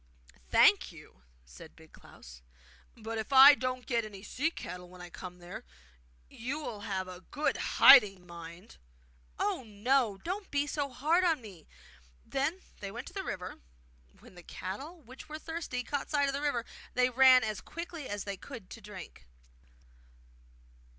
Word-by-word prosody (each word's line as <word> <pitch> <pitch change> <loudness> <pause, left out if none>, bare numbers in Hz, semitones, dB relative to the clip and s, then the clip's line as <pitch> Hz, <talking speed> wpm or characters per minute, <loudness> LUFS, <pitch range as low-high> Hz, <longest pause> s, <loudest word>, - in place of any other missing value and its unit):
'Thank - - +5
you,' 60 - -16 0.2
said 60 0 -14
Big - - -18
Klaus; - - -14 0.6
'but 225 0 -5
if 220 - -6
I 275 +2 +10
don't 255 -2 -3
get 235 -2 0
any 200 -3 -9
sea 285 +8 -1
cattle 180 - -8
when 180 0 -14
I 175 -1 -10
come 180 0 -9
there, 175 0 -9 0.6
you 255 +6 -5
will 230 -8 -6
have 195 -3 -3
a 180 0 -9
good 295 +9 -1 0.2
hiding, 195 -6 +8
mind!' 170 +3 -11 0.6
'Oh, 400 -7 -1
no! 220 0 +1
Don't 375 - -5
be 285 0 0
so 290 -1 -2
hard 310 +8 +1
on 330 -4 +2
me!' 195 -9 -13 0.6
Then 310 +8 -1 0.2
they 200 - -5
went 240 +6 -7
to - - -19
the 390 - -3
river. 180 - -6 0.6
When - - -16
the 175 - -12
cattle, 280 - -7
which 260 +5 -13
were 305 - -5
thirsty, 320 -6 -5
caught 285 +3 -4
sight 285 -2 +2
of 275 - -1
the 280 - -3
water, 265 -6 -1 0.3
they 250 0 +3
ran 255 0 +7
as 215 -1 -3
quickly 335 -3 -7
as 205 -1 -3
they 200 -1 -5
could 230 -4 -11
to - - -9
drink. 190 - -11
240 Hz, 165 wpm, -31 LUFS, 190-285 Hz, 0.6 s, I